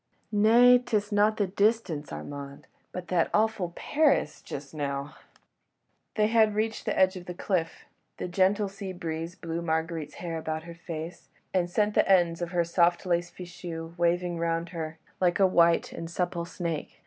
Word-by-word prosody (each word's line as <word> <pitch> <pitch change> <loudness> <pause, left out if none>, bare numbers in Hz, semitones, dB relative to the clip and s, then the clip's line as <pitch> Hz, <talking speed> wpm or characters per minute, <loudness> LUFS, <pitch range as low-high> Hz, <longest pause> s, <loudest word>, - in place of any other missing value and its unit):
"Nay, 235 +4 +6
'tis 215 -4 -1
not 210 +1 +3
the 205 - +2
distance, 200 -6 0
Armand—but 140 +5 -8
that 175 -3 +2
awful 215 -5 +1
Paris... 285 - +1
just 140 +1 -8
now.. 140 -1 -3 0.5
." - - -49
They 215 - +3
had 220 -1 +3
reached 220 +1 -1
the - - -1
edge 190 0 +4
of 180 -1 -9
the 180 - -5
cliff. 175 -3 -2 0.3
The - - -4
gentle 195 +3 +2
sea 195 -1 -7
breeze 165 0 -5
blew 165 0 -4
Marguerite's 160 -1 -2
hair 165 -2 -4
about 160 0 -4
her 170 0 -9
face, 165 0 -7 0.2
and 180 -2 +1
sent 210 +3 +1
the - - +3
ends 175 -2 +3
of 175 - -2
her 175 -1 +1
soft 170 +1 +2
lace 175 -1 0
fichu 170 -2 -8
waving 175 0 0
round 165 0 -1
her, 160 -2 -5 0.2
like 180 0 +2
a 195 - +6
white 170 -2 +3
and 165 - -6
supple 175 0 -2
snake. 170 -3 -4
175 Hz, 170 wpm, -28 LUFS, 165-200 Hz, 0.5 s, Nay